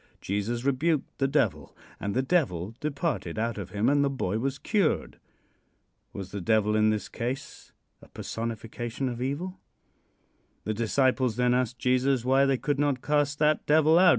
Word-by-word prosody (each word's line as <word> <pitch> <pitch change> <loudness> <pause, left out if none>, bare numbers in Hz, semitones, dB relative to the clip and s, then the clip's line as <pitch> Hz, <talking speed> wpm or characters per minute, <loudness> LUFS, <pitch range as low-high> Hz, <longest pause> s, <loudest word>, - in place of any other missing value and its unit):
Jesus 105 +5 -2
rebuked 140 +3 0
the 135 - +3
devil, 145 +2 0 0.2
and 100 +1 -3
the 130 - +2
devil 115 - 0
departed 140 - -2
out 115 -1 -1
of 95 - -6
him 105 +2 0
and 140 +1 +4
the 140 - +2
boy 110 -6 -2
was 135 +3 -2
cured. 200 0 0 0.9
Was 95 -1 -7
the 100 - -4
devil 105 +2 +2
in 110 0 +4
this 105 -3 -1
case 130 +4 -5 0.3
a - - -15
personification 115 +3 -4
of 120 -1 -4
evil? 170 +8 -3 1.0
The 110 - -1
disciples 125 +2 +1
then 125 +1 +2
asked 125 -1 0
Jesus 130 +1 +1
why 135 +2 +4
they 135 -1 +2
could 145 +2 -1
not 145 -3 +1
cast 145 -1 +1
that 150 0 +2
devil 155 +2 +5
out. 185 0 +7
130 Hz, 165 wpm, -27 LUFS, 110-145 Hz, 1.0 s, out